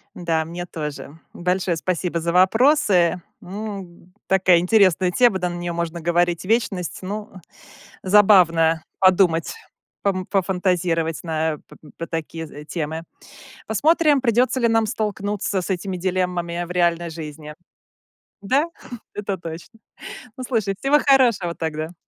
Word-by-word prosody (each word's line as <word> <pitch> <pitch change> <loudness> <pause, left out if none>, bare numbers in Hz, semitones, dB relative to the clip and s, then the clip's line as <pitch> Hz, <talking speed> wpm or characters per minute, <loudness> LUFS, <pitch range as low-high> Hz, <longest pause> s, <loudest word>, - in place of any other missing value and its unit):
Да, 165 -2 -1
мне 175 +2 -6
тоже. 150 -2 -7
Большое 180 0 -1
спасибо 175 0 -2
за 170 +1 -1
вопросы. 190 - +3 0.2
М, 190 -2 -8 0.2
такая 185 -2 +4
интересная 185 -2 +3
тема, 235 -1 +3
да, 180 - 0
на 175 - -5
нее 175 0 -4
можно 170 0 -3
говорить 175 +1 +1
вечность. 195 -4 -1
Ну, 210 +3 -6 0.7
забавно 180 -5 +4 0.2
подумать, 185 -3 +3 0.5
пом 185 -2 -1
пофантазировать 180 -4 0
на 160 -2 -1
п - - -15 0.2
по 165 - -4
такие, 165 0 -5
э, 150 -1 -11
темы. 160 0 -4 0.7
Посмотрим, 300 - +3
придётся 250 +1 +1
ли 235 - +3
нам 225 -1 +2
столкнуться 205 -2 -2
с 180 - -6
этими 190 0 -2
дилеммами 180 -1 -2
в 175 - -10
реальной 170 -1 +1
жизни. 150 -1 -8 0.9
Да, 260 +10 +2 0.5
это 200 -1 -3
точно 170 +7 -9 0.6
Ну, 255 - -5
слушай, 215 -6 -1
всего 285 +2 +3
хорошего 240 -12 +3
тогда. 160 +1 -4
180 Hz, 130 wpm, -22 LUFS, 170-205 Hz, 0.9 s, такая